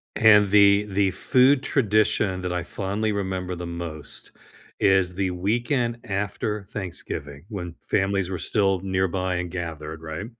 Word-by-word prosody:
and 105 -3 +6
the 100 0 +6
the 95 0 +2
food 130 +7 +3
tradition 105 -6 +1
that 90 -1 -3
I 90 - -1
fondly 100 +5 -2
remember 95 -2 -3
the 85 0 -6
most 85 -3 -7 0.5
is 95 -2 +3
the 95 -1 0
weekend 120 +6 0
after 105 0 -2
Thanksgiving 85 -7 -7
when 90 -5 -6
families 95 -1 0
were 90 - -3
still 95 +2 +1
nearby 95 -1 -1
and 90 0 -3
gathered, 80 -2 -6
right? 80 +6 -5
95 Hz, 140 wpm, -24 LUFS, 90-105 Hz, 0.5 s, and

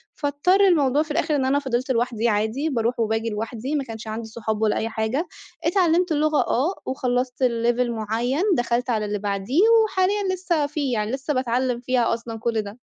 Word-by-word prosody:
فاضطر 295 +7 +2
الموضوع 295 -5 +3
في 310 - -9
الآخِر 310 0 0
إن 270 -2 +1
أنا 275 +2 +2
فضِلت 260 -1 -2
لوحدي 235 -1 0
عادي، 220 +8 0
باروح 235 -3 -1
وباجي 225 0 0
لوحدي، 225 +6 -4
ما 285 - 0
كانش 225 -3 -8
عندي 220 +1 -5
صحاب 220 -1 -4
ولا 215 -1 +2
أي 225 - -1
حاجة، 225 +9 -2 0.4
اتعلّمت 350 0 +2
اللغة 305 0 +2
آه 305 +11 +1
وخلّصت 250 0 -1
لlevel 240 0 +1
معين 235 - -1
دخَلت 240 +1 0
على 215 -3 0
اللي 210 0 -2
بعديه 200 - 0 0.2
وحاليًا 385 -1 0
لسه 345 -5 0
فيه، 285 -3 -2
يعني 215 -1 -1
لسه 270 +3 -2
باتعلّم 250 -1 0
فيها 245 -1 +1
أصلًا 230 -1 -5
كُل 225 -1 0
ده. 205 +1 -9
250 Hz, 180 wpm, -23 LUFS, 225-290 Hz, 0.4 s, الموضوع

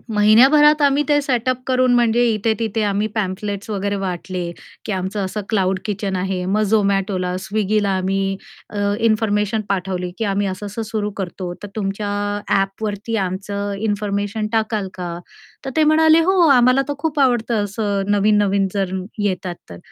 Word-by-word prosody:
महिन्याभरात 270 +9 +6
आम्ही 285 0 +3
ते 290 0 +4
सेटअप 255 -2 0
करून 255 -1 +3
म्हणजे 240 0 +3
इथे-तिथे 220 0 -1
आम्ही 205 +1 0
पॅम्फलेट्स 200 0 -3
वगैरे 200 -1 -1
वाटले, 180 -2 -4 0.3
की - - -3
आमचं 190 +1 -2
असं 210 +3 -4
क्लाउड 190 -3 +1
किचन 200 -2 -2
आहे. 185 0 -2
मग 200 +3 +1
Zomatoला, 195 -3 +1
Swiggyला 210 0 0
आम्ही 195 +1 -1 0.4
अ, 205 - -3 0.2
इन्फॉर्मेशन 215 -1 +1
पाठवली, 180 -2 -2
की 225 - -1
आम्ही 200 0 0
असं-असं 205 +3 -5
सुरू 215 -2 -3
करतो, 180 -2 -5
तर - - -5
तुमच्या 205 0 -3 0.4
ॲपवरती 205 +3 -1
आमचं 200 +2 -4 0.2
इन्फॉर्मेशन 205 +1 -2
टाकाल 220 -2 0
का? 175 -2 -5 0.5
तर - - -2
ते 315 - +4
म्हणाले, 315 +1 +5
"हो, 375 +3 +2
आम्हाला 255 0 +5
तर 290 - -1
खूप 310 0 -2
आवडतं 240 -5 +2
असं 205 -1 -2
नवीन-नवीन 205 -1 +3
जर 195 -2 -1 0.3
येतात 185 -3 -2
तर." 85 - -9
205 Hz, 150 wpm, -20 LUFS, 195-225 Hz, 0.5 s, महिन्याभरात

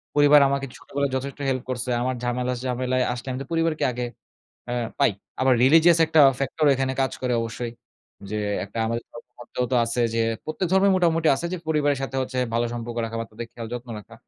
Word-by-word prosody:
পরিবার 145 0 +7
আমাকে 140 0 -1
ছোটবেলায় 140 -1 -3
যথেষ্ট 135 +2 -4
হেল্প 130 -1 -1
করছে। 125 0 -3
আমার 130 +1 -1
ঝামেলা 125 +1 -1
ঝামেলায় 130 0 0
আসলে 120 +1 -8
আমি 130 - -4
তো 135 - -16
পরিবারকে 165 -1 +1
আগে 125 +1 -3 0.7
এ - - -1 0.3
পাই। - - +4 0.3
আবার 130 0 +4
religious 165 +5 +6
একটা 160 -1 +4 0.2
ফ্যাক্টর 140 +3 0
এখানে 130 0 -1
কাজ 130 - +1
করে 125 -1 +1
অবশ্যই। 115 +1 -5 0.6
যে 105 - -2 0.3
একটা 100 +3 -8
আমাদের 115 +1 -2
ধর্মেগ্রন্থেও 120 +1 -6
তো - - +4
আছে 115 +1 -2
যে, 115 - +1 0.2
প্রত্যেক 155 +4 -2
ধর্মে 190 +1 +5
মোটামুটি 165 -3 +2
আছে 170 - -3
যে 185 - -2
পরিবারের 145 -3 +2
সাথে 135 0 -4
হচ্ছে 130 0 -4 0.2
ভালো 120 +1 +2
সম্পর্ক 120 0 -5
রাখা 115 0 -5
বা, - - -2
তাদের 115 +2 -7
খেয়াল 115 -1 -7
যত্ন 120 0 -6
রাখা। 105 - -13
130 Hz, 200 wpm, -24 LUFS, 120-145 Hz, 0.7 s, পরিবার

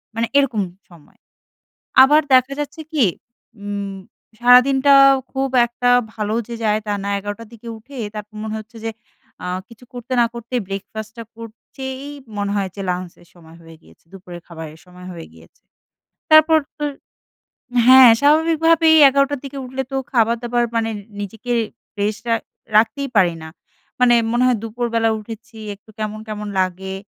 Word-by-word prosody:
মানে 230 0 0
এরকম 245 -7 +2 0.3
সময়ে। 170 -4 -20 0.8
আবার 295 +3 +6
দেখা 255 +2 +4
যাচ্ছে 295 +2 -6
কি 285 -7 +3 0.6
উম 200 -1 -5 0.5
সারাদিনটা 265 +3 +5 0.4
খুব 270 0 -1 0.2
একটা 245 +1 -1 0.2
ভালো 215 0 -2
যে 235 - -5
যায় 215 0 +1
তা 205 - -1
না। - - -3
১১ঃ০০ 205 +3 -6
র 215 - -19
দিকে 230 +1 -12
উঠে 270 +5 -14 0.2
তারপর 210 0 -8
মনে 220 0 -4
হচ্ছে 225 +2 -12
যে 225 - -1 0.5
আ - - -4 0.2
কিছু 235 +1 -16
করতে 245 +1 -8
না - - +5
করতে 235 +1 -8
breakfast 210 +2 -7
টা 230 - -6
করতেই 260 +4 -9 0.3
মনে 200 0 -2
হয় 195 -1 -1
যে - - -7
lunch 180 -1 -4
এর 170 - -22
সময় 165 -1 -17
হয়ে 165 0 -14
গিয়েছে। 80 - -22
দুপুরের 180 -2 -11
খাবারের 160 -2 -10
সময় 180 0 -14
হয়ে 165 -2 -9
গিয়েছে। 80 0 -20 0.7
তারপর 310 +1 +7 0.2
তো 295 - -3 1.0
হ্যাঁ, 260 -2 +9
স্বাভাবিকভাবেই 320 +2 +4
১১ঃ০০ 275 +1 +1
র - - -10
দিকে 275 0 -7
উঠলে 260 +1 -4
তো - - -1 0.2
খাবার 230 -1 +3
দাবার 240 0 0
মানে 225 0 0 0.3
নিজেকে 225 +4 -5 0.5
rest 210 +3 -2
আ - - +5 0.4
রাখতেই 270 +6 +2
পারি 175 -4 +4
না। 160 - -8 0.5
মানে 245 -1 +5 0.2
মনে 240 +1 +1
হয় 245 -4 +2
দুপুরবেলা 230 0 -1
উঠেছি 225 +1 -11 0.2
একটু 205 +2 -21
কেমন, 215 0 -4
কেমন 210 -1 -5
লাগে। 185 +1 -3
225 Hz, 160 wpm, -19 LUFS, 205-260 Hz, 1.0 s, হ্যাঁ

